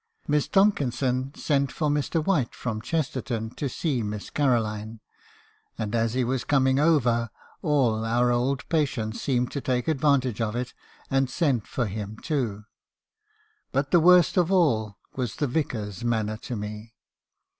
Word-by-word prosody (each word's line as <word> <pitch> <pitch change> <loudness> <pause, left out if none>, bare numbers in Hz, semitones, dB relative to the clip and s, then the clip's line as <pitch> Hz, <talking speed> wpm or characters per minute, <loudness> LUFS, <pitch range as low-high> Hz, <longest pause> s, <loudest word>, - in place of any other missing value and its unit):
"Miss 150 -1 +1
Tomkinson 135 - +1
sent 140 -3 0
for 155 - -1
Mr. 150 +2 0
White, 150 -12 +1
from 110 -4 -4
Chesterton 130 -6 -2
to 140 +2 -3
see 135 -1 -1
Miss 105 -1 -5
Caroline; 110 -5 0 0.8
and, 105 -1 -3
as 115 0 +1
he 130 - +2
was 125 +1 -1
coming 135 -1 +2
over, 120 -7 +3 0.3
all 125 -8 +2
our 120 +2 +2
old 130 +3 0
patients 130 -9 -1
seemed 125 -3 0
to 140 - -3
take 125 -2 -1
advantage 135 -6 +2
of 110 0 -1
it, 125 0 -3 0.4
and 135 -1 +2
send 130 - 0
for 120 - -1
him 105 +1 -5
too. 120 -10 -2 1.1
"But 135 +1 -1
the 175 - +6
worst 180 +2 +5
of 180 0 +3
all 110 - +2 0.2
was 125 -5 -3
the 145 - 0
Vicar's 120 - -3
manner 110 -2 0
to 120 - -6
me. 105 +2 -7
125 Hz, 150 wpm, -26 LUFS, 115-145 Hz, 1.1 s, the